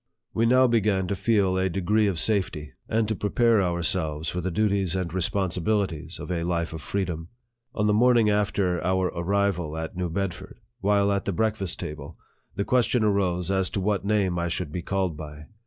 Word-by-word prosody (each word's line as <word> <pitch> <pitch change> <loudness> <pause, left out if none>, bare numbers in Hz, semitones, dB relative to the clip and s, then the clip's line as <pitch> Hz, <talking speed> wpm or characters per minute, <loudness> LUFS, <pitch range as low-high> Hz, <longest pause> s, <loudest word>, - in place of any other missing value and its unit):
We 115 +1 +2
now 130 +2 +5
began 105 -5 +2
to 100 - 0
feel 95 -3 +2
a 95 0 +1
degree 100 +4 +1
of 95 -5 -1
safety, 85 -9 0 0.2
and 110 -1 +1
to 110 - 0
prepare 115 +2 +2
ourselves 85 -3 0
for 90 - -3
the 95 - -2
duties 100 -1 0
and 90 -3 -2
responsibilities 95 -3 -1
of - - -6
a 85 -2 -1
life 85 -1 -1
of 80 - -6
freedom. 85 -1 -3 0.5
On 105 - 0
the 105 - +3
morning 120 0 +4
after 100 -4 +1
our 95 0 +1
arrival 90 -3 -1
at 80 +1 -5
New 90 -1 -2
Bedford, 95 +2 -4 0.2
while 100 0 +2
at 100 -2 -1
the - - 0
breakfast 110 -2 -1
table, 75 -2 -7 0.4
the 100 - -1
question 125 -2 +2
arose 95 -3 +1
as 95 -1 +1
to - - -3
what 100 0 0
name 100 -4 +1
I 85 - -1
should 85 -2 -3
be 90 - -3
called 95 -2 -1
by. 75 0 -9
95 Hz, 190 wpm, -25 LUFS, 85-105 Hz, 0.5 s, now